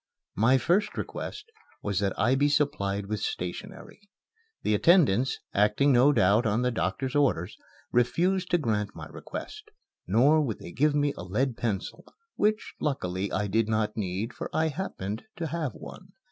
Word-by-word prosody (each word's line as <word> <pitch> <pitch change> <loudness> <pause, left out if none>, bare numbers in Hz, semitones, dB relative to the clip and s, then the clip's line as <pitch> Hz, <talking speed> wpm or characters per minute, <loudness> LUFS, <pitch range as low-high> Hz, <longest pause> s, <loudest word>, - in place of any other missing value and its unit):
My 120 +6 +4
first 175 - +1
request 430 +2 -6 0.3
was 100 -2 0
that 100 -2 -1
I 115 +6 +3
be 140 +2 +3
supplied 105 -10 0
with 105 +1 -3
stationery. 90 - -6 0.5
The - - +1
attendants, 130 - +4 0.2
acting 105 +8 +3
no 130 +3 +6
doubt 105 -1 +3
on 110 +4 +1
the 125 - +1
doctor's 125 +4 -2
orders, 110 - +1 0.4
refused 180 +10 +1
to 175 - +3
grant 105 -8 -1
my - - -7
request; 430 0 -8 0.4
nor 145 +7 +4
would 120 -8 -2
they - - -10
give 145 +7 +2
me 145 -1 +1
a - - -7
lead 120 +8 -1
pencil 105 -5 -3 0.3
which, 215 +1 0
luckily, 95 - -2
I 105 - 0
did 110 +2 +1
not 110 -1 0
need, 100 +2 -3
for - - -6
I 160 0 +1
happened 110 - -5
to 170 - -4
have 155 -6 -3
one. 185 0 -11
125 Hz, 160 wpm, -27 LUFS, 105-150 Hz, 0.5 s, no